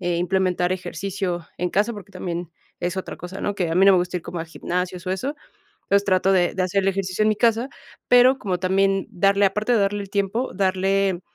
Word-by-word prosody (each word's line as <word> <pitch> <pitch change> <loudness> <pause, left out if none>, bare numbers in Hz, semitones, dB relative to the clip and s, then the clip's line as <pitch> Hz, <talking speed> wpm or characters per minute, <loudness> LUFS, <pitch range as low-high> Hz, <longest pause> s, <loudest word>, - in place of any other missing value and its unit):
eh, 175 -2 -1
implementar 180 0 +1
ejercicio 180 -1 -4
en 180 0 -1
casa, 210 +5 +1
porque 205 -1 -11
también 175 -2 -5 0.3
es 175 +1 -2
otra 190 - -5
cosa, 180 +2 -8
¿no?, 205 0 -2
que 175 -3 -1
a - - -1
mí 190 +2 +5
no 200 - +8
me 185 - +5
gusta 180 0 -2
ir - - -15
como 170 +1 -6
a 165 - -3
gimnasios 180 +2 -4
o - - -1
eso. 260 +11 -2 0.5
Entonces, 200 0 +2
trato 190 0 +3
de 180 -2 +2
de 185 - +1
hacer 195 +2 +1
el 190 - -1
ejercicio 195 0 -1
en 215 - +4
mi 215 - +1
casa, 230 +3 +2 0.4
pero 250 +2 +6
como 185 -3 -2
también 195 +1 +1
darle, 195 +2 +3
aparte 210 +5 +1
de 230 - +3
darle 200 +1 0
el 200 - -9
tiempo, 200 +6 -1
darle 190 -1 +1
190 Hz, 225 wpm, -23 LUFS, 180-200 Hz, 0.5 s, no